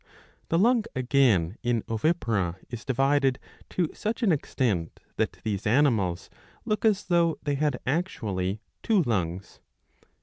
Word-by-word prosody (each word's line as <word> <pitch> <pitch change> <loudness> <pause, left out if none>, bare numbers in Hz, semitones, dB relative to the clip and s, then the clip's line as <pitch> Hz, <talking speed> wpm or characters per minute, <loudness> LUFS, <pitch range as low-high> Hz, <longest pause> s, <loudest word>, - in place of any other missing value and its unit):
The 165 - +2
lung 230 +4 +3
again 120 -8 +2
in 120 -2 0
ovipara 115 - 0 0.2
is 120 -2 -6
divided 135 0 +2 0.3
to 175 -4 -1
such 225 +3 -3
an 205 - +4
extent, 115 - -1 0.2
that - - 0
these 105 -1 -2
animals 105 - +2 0.4
look 215 - -1
as 210 -2 +3
though 170 -2 +2
they 145 - 0
had 145 -2 0
actually 110 - -2 0.2
two 210 -6 +3
lungs. 95 - -2
130 Hz, 130 wpm, -27 LUFS, 105-165 Hz, 0.4 s, an